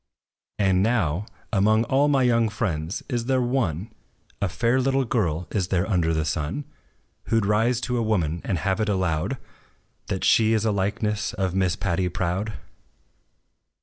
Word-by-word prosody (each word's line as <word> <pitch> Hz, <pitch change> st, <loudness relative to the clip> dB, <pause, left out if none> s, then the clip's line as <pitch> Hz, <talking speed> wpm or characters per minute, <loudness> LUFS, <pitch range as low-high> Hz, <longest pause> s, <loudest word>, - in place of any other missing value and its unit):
And 95 Hz, -2 st, +3 dB
now, 105 Hz, -4 st, +1 dB, 0.3 s
among 110 Hz, +2 st, +4 dB
all 135 Hz, +5 st, +2 dB
my 140 Hz, -3 st, +3 dB
young 115 Hz, -2 st, +3 dB
friends, 90 Hz, -5 st, -3 dB
is 120 Hz, -4 st, -2 dB
there 130 Hz, 0 st, +2 dB
one, 115 Hz, -, -1 dB, 0.5 s
A 100 Hz, -, +1 dB
fair 120 Hz, +7 st, +1 dB
little 135 Hz, +1 st, +1 dB
girl 90 Hz, -8 st, -1 dB
is 95 Hz, -4 st, 0 dB
there 90 Hz, 0 st, 0 dB
under 85 Hz, -6 st, +1 dB
the 80 Hz, -1 st, 0 dB
sun, 80 Hz, -, -2 dB, 0.6 s
Who 115 Hz, -, +2 dB
'd 105 Hz, -, -1 dB
rise 115 Hz, +4 st, +2 dB
to 125 Hz, 0 st, -1 dB
a -, -, +1 dB
woman, 85 Hz, -7 st, 0 dB
and 95 Hz, -, -1 dB
have 95 Hz, +4 st, -1 dB
it 110 Hz, -, 0 dB
allowed 95 Hz, +3 st, 0 dB, 0.7 s
That 95 Hz, -, -3 dB
she 110 Hz, 0 st, +4 dB
is 110 Hz, 0 st, +1 dB
a 110 Hz, -, +2 dB
likeness 105 Hz, +2 st, -1 dB
of 95 Hz, -2 st, -1 dB
Miss 95 Hz, -2 st, +1 dB
PATTY 90 Hz, -1 st, -1 dB
PROUD? 95 Hz, +5 st, -2 dB
105 Hz, 165 wpm, -24 LUFS, 90-115 Hz, 0.7 s, among